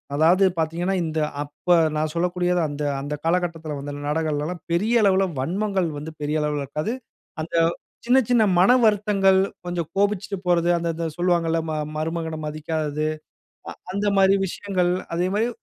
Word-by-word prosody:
அதாவது 170 +6 +4 0.2
பார்த்தீங்கன்னா 170 +4 0
இந்த 160 -1 -2 0.2
அப்ப 150 +5 +1 0.2
நான் 155 0 -1
சொல்லக்கூடியது 180 0 +1
அந்த, 145 +1 -4 0.2
அந்த 145 +2 -4
காலகட்டத்தில 165 -3 -1
வந்த 145 +1 -6
நாடகங்கள்லாம் 155 +2 -2
பெரிய 220 +7 +2
அளவுல 195 -1 +4
வன்மங்கள் 190 +4 0
வந்து, 150 +2 -6
பெரிய 150 +1 0
அளவுல 150 -1 -1
இருக்காது. 150 - -3 0.5
அந்த 160 +2 -5 0.5
சின்ன, 250 +2 +5
சின்ன 240 -3 +4 0.2
மன 190 +6 +6
வருத்தங்கள் 200 -2 +3 0.3
கொஞ்சம் 175 -3 -3
கோபிச்சிட்டு 200 0 0
போறது. 175 -1 +3
அந்த, 170 0 -2
அந்த 165 0 -2
சொல்வாங்கல்ல, 170 -2 +1
ம - - -2 0.2
மருமகன 160 0 -3
மதிக்காதது. 155 0 -2 0.6
அ - - -6 0.2
அந்தமாரி 200 -1 +3
விஷயங்கள் 180 -1 -1 0.2
அதேமாரி 190 +6 0
170 Hz, 140 wpm, -23 LUFS, 155-195 Hz, 0.6 s, மன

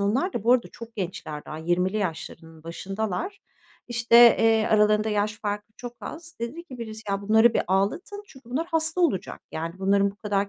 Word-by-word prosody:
Onlar 255 - +1
da - - -4
bu 240 - +5
arada 250 -2 +2
çok 230 -1 -11
gençler 170 -6 -5
daha, 155 - -7
20'li 175 +4 0
yaşlarının 165 -4 -5
başındalar. 200 - -4 0.5
İşte, 230 -1 +3 0.2
eee, 225 -1 +3
aralarında 215 0 +3
yaş 210 0 -1
farkı 205 0 -4
çok 245 -1 -7
az, 330 +1 -8
dedi 275 +9 -5
ki 260 -8 -11
birisi, 220 -1 -7
"Ya, 195 0 -1
bunları 220 +3 +4
bir - - +2
ağlatın 200 - -1
çünkü 265 -8 -16
bunlar 305 +7 -1
hasta 325 0 0
olacak 295 - 0
yani 165 +1 -4
bunların 200 +1 +2
bu 200 - -18
kadar 205 -1 -1
215 Hz, 185 wpm, -25 LUFS, 195-240 Hz, 0.5 s, bu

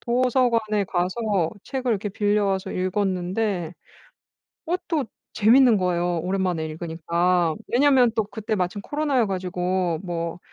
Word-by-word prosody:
도서관에 235 -4 +1
가서 185 0 -1
책을 260 -3 -2
이렇게 205 0 -2
빌려와서 205 -1 0
읽었는데 185 -1 -1 0.9
그것도 340 -4 -1 0.3
재미있는 235 +2 +5
거예요 175 -2 0
오랜만에 180 -2 -1
읽으니까. 170 +1 0
왜냐하면 255 -2 +4
또 220 - +2
그때 215 +1 -5
마침 185 +1 -1
코로나여 290 -4 0
가지고 180 -2 -1
뭐 170 -2 -4
195 Hz, 310 characters per minute, -24 LUFS, 180-230 Hz, 0.9 s, 재미있는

